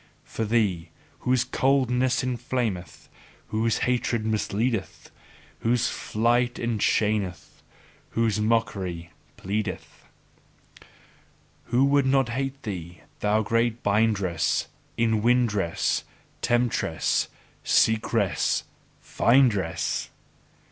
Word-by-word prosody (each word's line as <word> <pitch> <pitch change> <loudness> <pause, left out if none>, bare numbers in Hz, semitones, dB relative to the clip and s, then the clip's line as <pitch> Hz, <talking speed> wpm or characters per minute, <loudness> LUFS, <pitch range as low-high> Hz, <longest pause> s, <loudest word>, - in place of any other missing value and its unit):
For 115 - -4
thee, 100 -7 0 0.3
whose 125 -1 +2
coldness 130 -1 +1
inflameth, 120 -7 -3 0.4
whose 110 +1 +1
hatred 120 -2 0
misleadeth, 110 0 -2 0.5
whose 120 +1 +1
flight 120 +2 0
enchaineth, 105 -4 -1 0.6
whose 110 -2 +2
mockery 100 -7 -1 0.3
pleadeth: 100 0 -4 1.6
Who 125 +3 +3
would 140 -1 +3
not 135 -2 +3
hate 135 +2 -3
thee, 90 -5 -6 0.2
thou 105 +1 +2
great 115 +2 0
bindress, 100 -5 +1 0.3
inwindress, 110 -4 +1 0.4
temptress, 120 -9 +1 0.4
seekress, 110 -2 +2 0.4
findress! 115 -9 +1
115 Hz, 75 wpm, -25 LUFS, 105-125 Hz, 1.6 s, Who